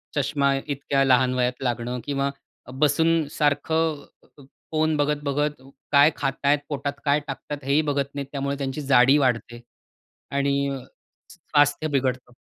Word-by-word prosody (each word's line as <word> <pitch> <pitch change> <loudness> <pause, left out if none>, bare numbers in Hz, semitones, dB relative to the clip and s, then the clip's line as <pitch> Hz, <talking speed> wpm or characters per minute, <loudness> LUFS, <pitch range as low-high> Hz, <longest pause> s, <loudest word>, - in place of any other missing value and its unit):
चष्मा 140 -1 +1
इतक्या 140 -1 0
लहान 130 -1 +3
वयात 125 0 -1
लागणं 120 0 -2
किंवा 140 -1 -1 0.4
बसून 155 +3 +2
सारखं 150 +1 0 0.7
फोन 155 0 +1
अ, - - +4
बघत-बघत 145 -1 -1 0.3
काय 145 +2 +6
खाताय 140 +2 +1
पोटात 140 -1 -3
काय 145 +1 +3
टाकतात 145 -1 -6
हेही 140 +3 +2
बघत 140 -2 -2
नाहीत, 140 -1 -4
त्यामुळे 140 0 -2
त्यांची 135 +1 -4
जाडी 135 0 +5
वाढते. 120 -3 -1 0.7
आणि 140 0 +1
अ, 135 -1 -4 0.6
स्वास्थ्य 145 -2 +1
बिघडतं. 130 -3 -1
140 Hz, 130 wpm, -24 LUFS, 135-145 Hz, 0.7 s, काय